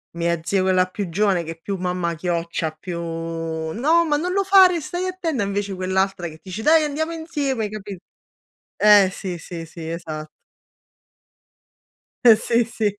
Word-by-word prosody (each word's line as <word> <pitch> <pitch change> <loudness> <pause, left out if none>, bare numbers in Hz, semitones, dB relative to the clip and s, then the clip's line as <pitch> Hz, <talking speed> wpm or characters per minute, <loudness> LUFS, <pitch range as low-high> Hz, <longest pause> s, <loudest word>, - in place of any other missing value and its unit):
mia 170 0 0
zia 190 +3 +1
quella 185 -1 +3
più 200 +1 -4
giovane 190 -1 +1
che 165 - -6
è 165 - -10
più 195 +2 -3
mamma 180 -1 -2
chioccia, 170 -1 -2
più: 170 +2 -7
"No, 165 - -1
ma 295 -2 +1
non 355 +4 -2
lo 395 +1 +2
fare, 375 -3 +6
stai 350 +5 -4
attenta!" 335 - -2
Invece 200 0 -2
quell'altra 185 0 -1
che 160 -1 -11
dice: 190 +3 -6
"Dai, 315 +3 +5
andiamo 310 +2 -2
insieme!" 285 -9 -2
Capì 205 -2 -7 0.8
eh, 205 -2 +6
sì, 185 -2 -5
sì, 165 0 -7
sì, 165 0 -9
esat 160 -2 -6 2.0
Eh 230 -2 +9
sì, 235 +2 +1
sì, 220 -2 -2
195 Hz, 155 wpm, -22 LUFS, 170-270 Hz, 2.0 s, Eh